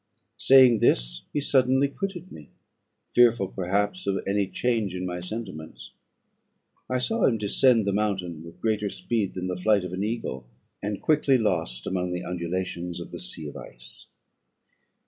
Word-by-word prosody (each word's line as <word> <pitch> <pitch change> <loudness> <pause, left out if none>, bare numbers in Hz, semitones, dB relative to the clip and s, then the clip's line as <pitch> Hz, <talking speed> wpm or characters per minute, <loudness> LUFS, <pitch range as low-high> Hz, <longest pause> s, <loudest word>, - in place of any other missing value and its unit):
Saying 130 -1 +7
this, - - +2
he 150 - -1
suddenly 130 -1 +3
quitted 185 +4 -6
me, 75 - -12 0.6
fearful, 120 -5 +4
perhaps, 95 +1 -1
of 95 -1 +1
any 100 0 +1
change 110 -4 -1
in 90 0 -3
my 90 -1 -4
sentiments. 90 -4 -7 1.0
I 130 - +1
saw 225 - +1
him 115 - +3
descend 110 +2 +3
the 100 - +1
mountain 95 -6 -2
with 85 0 -13
greater 105 -2 0
speed 100 +2 -2
than 90 -1 -3
the 90 -1 -2
flight 100 +1 +2
of 90 - -6
an 95 +2 -2
eagle, 105 - -4 0.3
and 105 0 -3
quickly 145 -3 +3
lost 85 - -1
among 90 -1 -2
the 90 - -3
undulations 90 0 -3
of 85 - -8
the 85 - -7
sea 85 -3 -6
of 70 - -9
ice. - - -11
100 Hz, 160 wpm, -26 LUFS, 90-115 Hz, 1.0 s, Saying